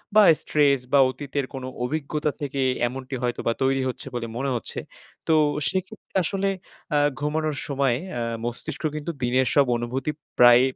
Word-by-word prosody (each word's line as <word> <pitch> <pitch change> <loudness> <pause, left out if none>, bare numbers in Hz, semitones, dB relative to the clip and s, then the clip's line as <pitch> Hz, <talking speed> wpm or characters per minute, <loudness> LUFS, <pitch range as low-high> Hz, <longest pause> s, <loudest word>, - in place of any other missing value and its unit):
বা 215 - +9 0.2
স্ট্রেস 145 -2 +3
বা 140 - +7
অতীতের 140 +1 -3
কোনো 130 -1 -5 0.2
অভিজ্ঞতা 150 +2 -1
থেকে 140 -1 -2 0.3
এমনটি 130 +1 -5
হয়তো 120 -1 -1
বা 115 - +3
তৈরি 135 0 +2
হচ্ছে, 130 - -6
বলে 120 -1 -2
মনে 135 +2 -1
হচ্ছে। 120 - -5 0.5
তো, 160 - +4 0.4
সেক্ষেত্রে 190 +4 -5
আসলে 195 +3 0 0.5
আ - - +5 0.2
ঘুমানোর 155 +1 -1
সময় 135 -3 +1 0.2
আ - - -1 0.2
মস্তিষ্ক 120 +6 -5
কিন্তু 155 +2 -3
দিনের 130 +1 +2
সব 140 -2 +6
অনুভূতি 125 +5 -2 0.3
প্রায় 120 0 +9
140 Hz, 155 wpm, -25 LUFS, 125-150 Hz, 0.5 s, বা